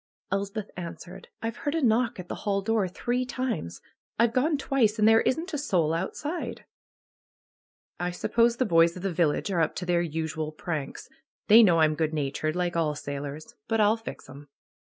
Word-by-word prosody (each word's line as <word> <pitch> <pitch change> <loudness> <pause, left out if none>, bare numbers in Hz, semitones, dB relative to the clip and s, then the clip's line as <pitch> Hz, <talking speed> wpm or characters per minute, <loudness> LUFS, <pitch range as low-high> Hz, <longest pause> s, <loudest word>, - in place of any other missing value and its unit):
Elspeth 200 +1 -3
answered: 175 0 -8 0.2
^H've 225 +1 -3
lieard 290 +3 0
a - - 0
knock 235 -1 +2
at 180 - -7
the - - -4
hall 200 -2 0
door 220 -2 +1
three 245 +7 -2
times. 230 - -4 0.4
I've 230 0 +3
gone 290 +5 +2
twice, 250 -6 +1
and 215 0 +4
there 225 0 +6
isn't 330 +7 -1
a 295 - -1
soul 170 - +1
outside." 290 - -4 1.5
suppose 235 +6 +2
the 255 - +1
boys 165 -2 +4
of 180 - -8
the 195 -2 -1
village 165 +3 +1
are 175 -3 +1
up 160 - 0
to 180 - -4
their 175 -1 +2
usual 160 -1 -3
pranks. 155 -3 -5 0.4
They 220 +3 +9
know 175 -7 +5
I'm 155 -1 +4
good 155 0 -1
natured, 150 +2 -2
like 180 -1 -1
all 155 -3 +1
sailors. 145 +1 -6
But 225 -1 0
I'll 210 +1 +4
fix 225 -9 -9
'em!" 140 +2 -12
185 Hz, 180 wpm, -27 LUFS, 160-230 Hz, 1.5 s, They